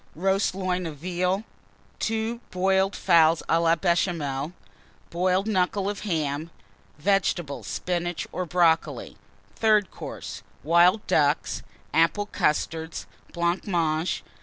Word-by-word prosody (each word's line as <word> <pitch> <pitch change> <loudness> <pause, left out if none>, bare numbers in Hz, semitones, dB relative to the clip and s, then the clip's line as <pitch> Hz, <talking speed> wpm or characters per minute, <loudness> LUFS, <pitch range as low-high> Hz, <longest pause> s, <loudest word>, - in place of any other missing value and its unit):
Roast 190 +3 +1
Loin 185 -2 -1
of 155 -2 -7
Veal. 180 +5 -1 0.6
Two 225 +1 -1
Boiled 190 +1 +1
Fowls 165 -2 +4
à 165 - +3
la 165 0 +4
Béchamel. 165 -5 0 0.6
Boiled 185 +3 +1
Knuckle 195 -1 +1
of 205 0 -3
Ham. 155 -5 -2 0.5
Vegetables 175 -4 0
Spinach 175 -1 -2
or 180 -1 -3
Brocoli. 165 -1 +1 0.4
THIRD 215 -3 +3
COURSE. - - -7 0.2
Wild 175 +7 +4
Ducks. 145 0 +1 0.3
Apple 165 +5 +3
Custards. 160 -2 -1 0.3
Blancmange. 170 -2 0
175 Hz, 105 wpm, -25 LUFS, 165-190 Hz, 0.6 s, Fowls